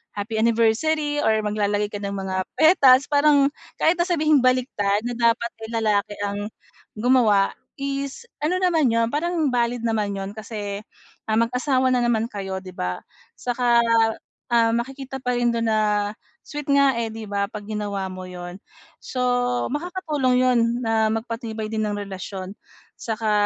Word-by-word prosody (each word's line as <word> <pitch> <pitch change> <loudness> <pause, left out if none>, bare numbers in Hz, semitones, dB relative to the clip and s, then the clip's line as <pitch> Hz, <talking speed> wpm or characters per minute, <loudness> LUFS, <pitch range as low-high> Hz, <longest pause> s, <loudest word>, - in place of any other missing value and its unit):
"Happy 210 +2 -4
Anniversary!" 270 +7 +2
Or 220 - +3
maglalagay 210 0 0
ka 205 - -4
ng 200 0 -3
mga 190 -1 -2 0.2
petals 280 -5 +6
parang, 285 -1 +5 0.4
kahit 320 - +5
na 345 - +3
sabihing 310 -5 +3
baligtad 230 -5 +1
na 245 - -2
dapat 235 0 +2 0.2
ay - - -12
lalaki 210 -1 +1
ang 205 +1 -3 0.5
gumawa 220 -4 +3 0.2
is, 275 - -4 0.2
ano 345 +5 +1
naman 335 -7 +3
'yon, 230 0 +2
parang 320 -1 0
valid 240 -1 0
naman 210 -3 0
'yon 195 0 -4
kasi, 210 -2 -5 0.5
ah, 220 - +2
mag-asawa 255 +2 +1
na 250 - +2
naman 230 -2 +1
kayo, 195 -3 -4
'di 185 -1 -11
ba? 90 - -3 0.4
Saka, 245 -1 +2 0.7
ah, 230 -1 +4
makikita 265 +2 -4
pa 250 0 0
rin 240 0 +2
dun 230 0 0
na 210 -1 +1 0.3
sweet 295 -1 -7
nga 280 -2 +4
eh, 230 - -1
'di 220 -1 -7
ba, 200 0 0
'pag 210 - -7
ginawa 205 -2 -3
mo 185 0 -7
'yun. 180 0 -8 0.5
So, 255 - -5 0.5
makakatulong 300 -5 -1
'yun 255 -1 +3 0.2
na 225 -1 +2
magpatibay 225 -1 -4
din 220 -1 -1
ng 205 - -2
relasyon. 195 -1 -6 0.5
Saka 220 -1 -1
230 Hz, 155 wpm, -23 LUFS, 205-265 Hz, 0.7 s, petals